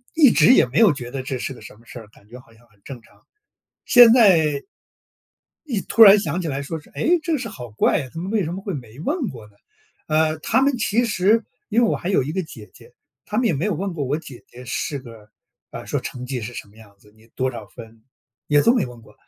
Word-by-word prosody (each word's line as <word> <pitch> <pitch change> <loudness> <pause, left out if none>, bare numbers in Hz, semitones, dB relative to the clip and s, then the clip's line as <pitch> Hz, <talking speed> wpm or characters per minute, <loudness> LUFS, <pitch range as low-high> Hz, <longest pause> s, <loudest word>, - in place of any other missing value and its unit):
一 295 -6 +6
直 245 - +5
也 - - +5
没 130 +5 -1
有 210 -8 +5
觉 125 -3 -8
得 135 0 -4
这 130 0 -4
是 135 - -5
个 - - -15
什 - - -13
么 115 +2 -23
事 120 - -10
儿， 110 - -13
感 105 -1 -24
觉 125 +2 -11
好 115 -2 -21
像 115 +2 -24
很 105 -1 -30
正 130 -3 -9
常， - - -26 0.6
现 245 -3 +8
在 165 - +4 1.0
一 235 -9 -2
突 225 - +3
然 205 -1 +9
想 175 -2 -3
起 170 - -4
来 140 -1 -3
说 160 +3 -6
是， - - -22
诶， 350 +2 +1
这 335 - -2
个 305 - +1
事 245 -2 -6
好 125 - -10
怪 105 - +1
啊， 130 - -9
他 165 - -7
们 185 +3 -5
为 215 -4 +1
什 165 - -5
么 185 - -6
会 195 -2 -5
没 120 -3 -10
问 265 - -2
过 115 -4 -11
呢？ 105 - -22 0.6
呃， 155 0 +1
他 260 - +1
们 275 -1 +1
其 230 +1 0
实 215 +1 +1 0.2
因 230 +2 +2
为 230 - +3
我 - - 0
还 175 - -6
有 190 - +2
一 145 +4 -5
个 190 - -2
姐 115 - -12
姐， - - -18 0.3
他 210 - -6
们 245 - +1
也 - - +2
没 145 +5 -3
有 210 - -1
问 190 +4 -4
过 150 -4 -3
我 140 +4 -2
姐 135 -6 -12
姐 125 +1 -13
是 140 +3 -4
个， 115 -5 -14 0.4
啊， - - -8
说 - - -3
成 125 0 -7
绩 125 -1 -4
是 115 +2 -7
什 110 - -9
么 100 - -23
样 110 -2 -17
子， 105 +1 -23
你 110 +1 -23
多 130 0 -1
少 - - -9
分 115 -2 -14 0.5
也 145 -1 +4
都 235 - +4
没 235 - +1
问 120 -1 -12
过。 105 -1 -19
150 Hz, 285 characters per minute, -21 LUFS, -, 1.0 s, 然